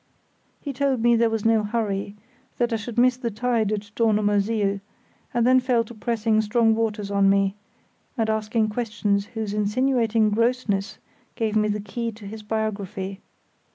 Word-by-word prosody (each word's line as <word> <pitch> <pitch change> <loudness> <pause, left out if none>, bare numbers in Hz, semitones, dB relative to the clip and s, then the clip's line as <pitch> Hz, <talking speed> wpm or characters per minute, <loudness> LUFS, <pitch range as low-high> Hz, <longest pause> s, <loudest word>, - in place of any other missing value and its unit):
He 280 - -5
told 265 -3 0
me 240 0 +5
there 230 0 +3
was 225 -1 -2
no 225 -1 +4
hurry, 205 -2 -2 0.4
that 240 -1 0
I - - +2
should 225 +2 -6
miss 250 +1 +4
the 245 -2 -2
tide 225 -1 0
at 205 -1 -4
Dornumersiel, 205 -2 +1 0.5
and 235 -1 +1
then 255 +1 +6
fell 250 -2 +2
to 230 - -12
pressing 220 -1 +1
strong 225 +1 +3
waters 215 -2 -2
on 200 -1 +4
me, 195 0 +3 0.6
and 225 -2 +1
asking 220 0 0
questions 210 -3 -1
whose 215 -2 -3
insinuating 225 0 +2
grossness 230 -3 0 0.4
gave 220 -2 -1
me 215 0 +3
the 210 0 -1
key 230 +3 -4
to 210 -1 -12
his 215 +2 -7
biography. 200 -3 -3
220 Hz, 160 wpm, -24 LUFS, 205-235 Hz, 0.6 s, then